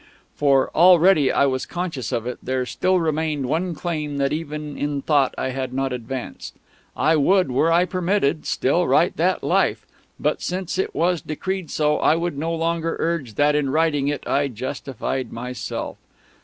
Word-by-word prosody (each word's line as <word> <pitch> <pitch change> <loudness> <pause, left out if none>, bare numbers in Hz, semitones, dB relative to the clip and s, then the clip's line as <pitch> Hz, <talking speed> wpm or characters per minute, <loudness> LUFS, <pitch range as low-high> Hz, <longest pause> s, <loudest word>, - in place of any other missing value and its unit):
For 135 -2 +3
already 175 -3 +6
I 140 - +3
was 130 -1 -1
conscious 165 - -4
of 115 - -2
it 125 0 -5
there 130 0 -1
still 185 +8 +1
remained 155 -3 -1
one 165 +6 -1
claim 150 -3 -3
that 140 0 +1
even 150 -2 -5
in 145 -1 -2
thought 145 -4 +2
I - - -1
had 130 -1 -4
not 135 -1 -1
advanced. 125 +1 -6 0.4
I 160 +2 +3
would, 180 +1 +3
were 155 +6 +2
I 175 +2 +4
permitted, 180 -4 0
still - - +1
write - - +3
that - - +1
"Life," - - +1 0.3
but, - - 0
since 185 0 -3
it - - -2
was 175 0 +1
decreed 185 +3 -4
so, 150 -1 +1
I 155 - +4
would 170 -1 -2
no 160 +4 -2
longer 165 0 -1
urge 160 -10 -2
that 145 0 +3
in 145 -2 +1
writing 150 -1 +1
it 145 0 -2
I 140 0 +1
justified 130 0 -4
myself. 125 +1 -5
150 Hz, 170 wpm, -22 LUFS, 135-170 Hz, 0.4 s, already